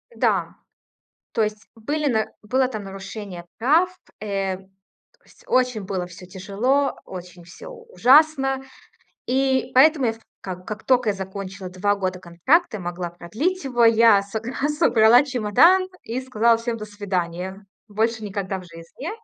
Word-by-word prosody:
Да. - - 0 0.8
То 225 - +2
есть 210 0 -4
были 290 +7 -2
на 220 -5 +1 0.2
было 255 +4 +1
там 215 -5 -6
нарушение 195 -2 -8
прав. 310 +10 +3 0.3
Э, 195 -2 -2
то 190 - -17 0.6
есть - - -22
очень 250 - +1
было 185 -2 -3
всё 180 +1 -12
тяжело, 205 +10 0
очень 180 -1 -10
всё 480 - -12
ужасно, 305 - +3 0.7
и 265 +1 +1
поэтому 280 -1 +5
я 225 - +1
в 225 - -14 0.2
как 185 -1 -7
как 215 0 -6
тока 250 -4 +3
я - - -1
закончила 190 -1 -7
2 200 +3 0
года 185 -2 -3
контракта, 215 - +1
и - - -9
могла 175 0 -4
продлить 220 - -3
его- 245 -3 +2
я 230 -3 +6
согра 225 +8 -3
собрала 245 -6 +5
чемодан, 285 - +4
и 240 +3 -4
сказала 235 -3 +2
всем: 230 0 -3
"До 215 - -6
свидания, 190 -1 -4 0.2
больше 220 +1 -1
никогда 195 -1 -3
в 185 - -11
жизни". 170 - -9
215 Hz, 150 wpm, -23 LUFS, 190-260 Hz, 0.8 s, я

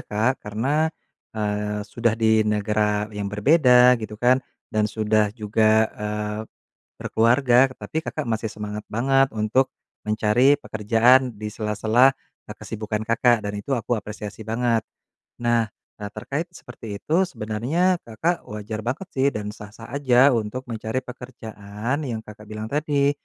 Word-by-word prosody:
Kak, 115 +6 -1
karena, 135 +10 0 0.5
eee, 105 0 -2
sudah 115 +1 0
di 110 -1 +3
negara 105 0 +1
yang 105 -1 -3
berbeda 125 +2 +5
gitu 105 -1 -6
kan, 125 +3 +3 0.3
dan 105 0 +1
sudah 110 0 +1
juga, 110 0 +2
eee, 105 0 -4 0.6
berkeluarga, 125 +3 +3
tetapi 160 +4 -5
Kakak 155 -7 -4
masih 110 -1 -2
semangat 105 0 -6
banget 135 +4 +2
untuk 110 +5 +1 0.3
mencari 110 +7 +3
pekerjaan 120 +4 +3
di 105 0 -6
sela-sela, 110 +5 +3 0.3
eee, - - -9
kesibukan 105 -1 -4
Kakak 115 0 +3
dan 105 0 -4
itu 105 +7 -4
aku 120 -1 0
apresiasi 105 0 -7
banget. 115 0 0 0.6
Nah, 120 -1 +2 0.3
eee, 105 - -5
terkait 155 +5 -3
seperti 115 -4 -9
itu 180 +5 +2
sebenarnya 160 - 0
Kakak 160 +10 -2
wajar 105 +1 -5
banget 130 - -4
sih 135 +1 +1
dan 105 -6 -2
sah-sah 105 +2 -12
aja 135 -1 +4
untuk 115 +2 -2
mencari 110 +3 -3
pekerjaan 120 +1 -5
yang 110 -3 -4
Kakak 105 0 -13
bilang 110 +1 -6
tadi, 145 -1 +2
110 Hz, 135 wpm, -23 LUFS, 105-130 Hz, 0.6 s, berbeda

